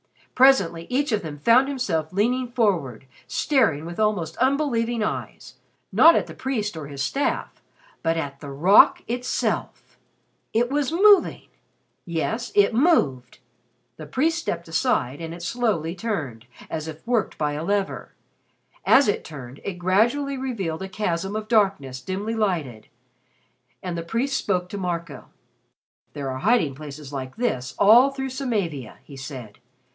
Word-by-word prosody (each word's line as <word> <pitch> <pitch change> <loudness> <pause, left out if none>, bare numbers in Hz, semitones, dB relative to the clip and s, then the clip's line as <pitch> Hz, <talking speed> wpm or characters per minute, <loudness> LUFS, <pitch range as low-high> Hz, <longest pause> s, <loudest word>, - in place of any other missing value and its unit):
Presently 195 -11 +4
each 275 +2 0
of 215 - +1
them 155 -3 -7
found 235 - +4
himself 185 - -2
leaning 245 +7 +1
forward, 190 - -1 0.2
staring 215 - +1
with 170 +3 -7
almost 200 -7 0
unbelieving 240 -4 +1
eyes, 215 - -5 0.3
not 330 +1 +7
at - - +1
the - - -10
priest 220 -8 -3
or 155 -3 -6
his 140 -1 -4
staff, 280 - -2 0.4
but 165 0 0
at 140 -3 -4
the 145 - -8
rock 170 +9 +5
itself! 245 +1 -3 0.5
It 240 +3 +1
was 290 -1 0
moving! 400 +3 +4 0.5
Yes, 220 +8 -3
it 205 +1 +4
moved. 150 - +2 0.6
The 155 - -9
priest 320 - +1
stepped 170 - -4
aside 160 - 0
and 165 0 -6
it 175 - -10
slowly 170 -6 -1
turned, 150 - -4 0.2
as 160 -1 -4
if 160 +4 -9
worked 235 -3 0
by 150 -1 -1
a 150 +2 -4
lever. 200 +2 -2 0.7
As 275 +1 +5
it 205 - 0
turned, 135 -4 -10
it 200 - -3
gradually 230 +11 +1
revealed 195 -12 -3
a 190 - -5
chasm 190 0 -2
of 215 0 -4
darkness 195 - +1
dimly 195 - -3
lighted, 165 - -2 1.0
and 180 -2 -3
the 170 - -3
priest 235 +11 -2
spoke 180 -6 -1
to 200 - -5
Marco. 170 -6 -4 0.9
"There 140 -3 -4
are 130 - -5
hiding 210 - +2
places 145 0 -9
like 130 -2 -5
this 130 - -2
all 235 +7 +7
through 270 -1 -5
Samavia," 205 - -3
he 140 - -13
said. 130 -6 -9
190 Hz, 150 wpm, -24 LUFS, 155-240 Hz, 1.0 s, not